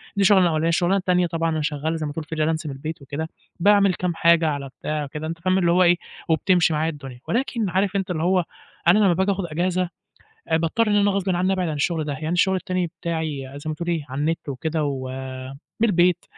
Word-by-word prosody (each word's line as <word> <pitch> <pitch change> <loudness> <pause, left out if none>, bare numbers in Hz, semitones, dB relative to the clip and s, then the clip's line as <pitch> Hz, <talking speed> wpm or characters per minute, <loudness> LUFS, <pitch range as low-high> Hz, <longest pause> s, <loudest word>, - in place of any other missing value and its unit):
دي 200 - 0
الشغلانة 190 -2 +6
الأولانية. 160 -1 +1
الشغلانة 175 +3 +2
التانية، 180 -2 +2
طبعًا، 165 0 -1
أنا 160 -1 -1
شغال، 150 +2 -1
زي 155 - -3
ما 145 - -3
تقول 160 -1 -5
في 160 - -6
Freelancer 155 +1 0
من 145 - -3
البيت 155 +3 -6
وكده. 150 +4 -5 0.3
باعمل 200 0 +5
كام 175 -2 -2
حاجة 170 -1 +4
على 140 -2 -2
بتاع 150 -1 -2
كده، 155 +2 -6
أنت 165 +1 -5
فاهم، 185 +2 +1
اللي 170 -2 +3
هو 180 +1 +5
إيه، 175 0 +5 0.3
وبتمشي 165 0 +3
معاه 155 +2 +1
الدنيا. 135 -5 -9
ولكن 230 -4 0
عارف 190 +2 0
أنت، 190 -1 -1
اللي 160 -1 -2
هو 180 -1 +2 0.4
أنا 205 +5 +6
لما 195 -4 +4
باجي 190 +3 +1
آخد 195 -2 -2
أجازة، 175 +2 -1 0.6
باضطر 165 +8 +2
إن 205 - +2
أنا 205 0 +4
غصب 195 -1 -1
عني 185 +2 +1
أبعد 180 -3 0
عن 155 - -2
الشغل 155 +1 0
ده، 145 - -3
يعني 155 +3 -4
الشغل 190 +2 +2
التاني 185 -2 -1
بتاعي، 160 -5 -4
زي 155 - -7
ما - - -2
تقول 170 +3 -5
إيه، 165 -4 -1
على 135 +2 -4
النت 160 0 -1
وكده، 155 +3 -2
ومن 130 -1 -5 0.3
البيت، 175 -2 +3
165 Hz, 225 wpm, -23 LUFS, 155-185 Hz, 0.6 s, الشغلانة